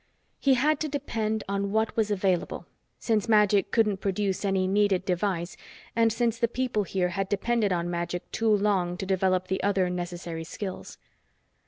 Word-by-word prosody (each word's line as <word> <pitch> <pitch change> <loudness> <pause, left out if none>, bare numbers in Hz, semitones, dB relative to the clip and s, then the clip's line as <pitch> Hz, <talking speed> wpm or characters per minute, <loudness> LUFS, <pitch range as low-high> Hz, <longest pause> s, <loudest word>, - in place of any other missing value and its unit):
He 270 -2 +4
had 290 +3 +2
to 310 - -2
depend 220 -6 -2
on 200 0 -1
what 220 +1 0
was 220 -2 +1
available, 190 -3 0 0.3
since 220 -1 0
magic 210 -2 +4
couldn't 215 -4 +2
produce 195 0 -1
any 195 -2 +1
needed 195 -1 +2
device 180 -2 -1 0.4
and 230 -1 +4
since 230 0 0
the 235 - +3
people 245 -2 -1
here 185 -2 -1
had 195 +2 -2
depended 210 +1 +1
on 175 -1 0
magic 175 0 -4
too 225 0 0
long 195 -4 +2
to 190 - -4
develop 185 -1 +1
the 190 - -1
other 190 -3 +1
necessary 175 -2 -5
skills. 190 +3 -7
200 Hz, 165 wpm, -27 LUFS, 185-220 Hz, 0.4 s, He